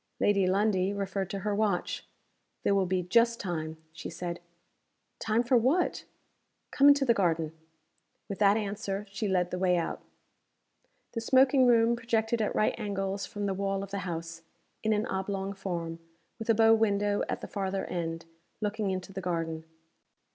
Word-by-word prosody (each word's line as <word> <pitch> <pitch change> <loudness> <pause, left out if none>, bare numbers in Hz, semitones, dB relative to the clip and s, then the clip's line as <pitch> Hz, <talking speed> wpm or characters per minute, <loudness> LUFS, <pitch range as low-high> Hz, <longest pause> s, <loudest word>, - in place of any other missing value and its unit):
Lady 200 -2 +3
Lundie 195 0 +2
referred 195 -1 -3
to 195 - -4
her 210 +1 -1
watch. 200 -3 -1 0.6
"There - - +3
will 195 -2 +2
be 185 0 0
just 230 +6 +3
time," 160 -4 -4 0.2
she 170 - -7
said. 175 +1 -5 0.8
"Time 225 +2 +1
for 245 +1 +2
what?" 270 +10 +1 0.7
"Come 280 - +5
into 285 -1 +6
the 235 - +5
garden." 165 -6 +1 0.8
With 200 - -5
that 205 0 +5
answer, 205 -1 -3
she 205 +2 -2
led 180 -2 +1
the 180 - -3
way 180 -1 +3
out 170 - -2 1.1
The 230 - -3
smoking 260 +2 +5
room 235 0 +4
projected 230 -1 0
at 210 - -1
right 215 - +2
angles 200 -2 -2
from 205 -1 -4
the 195 - 0
wall 195 0 -1
of 200 - -9
the 200 - -2
house, 165 -2 -5 0.4
in 220 - 0
an 215 0 +1
oblong 195 0 -3
form 170 -4 -4 0.4
with 225 - -6
a 225 - +5
bow 225 +1 +6
window 205 -2 +2
at - - -3
the - - -6
farther 195 -1 -2
end, 165 -1 -4 0.3
looking 210 -1 -1
into 185 0 -4
the 190 - -4
garden. 165 -2 -3
200 Hz, 170 wpm, -29 LUFS, 180-220 Hz, 1.1 s, into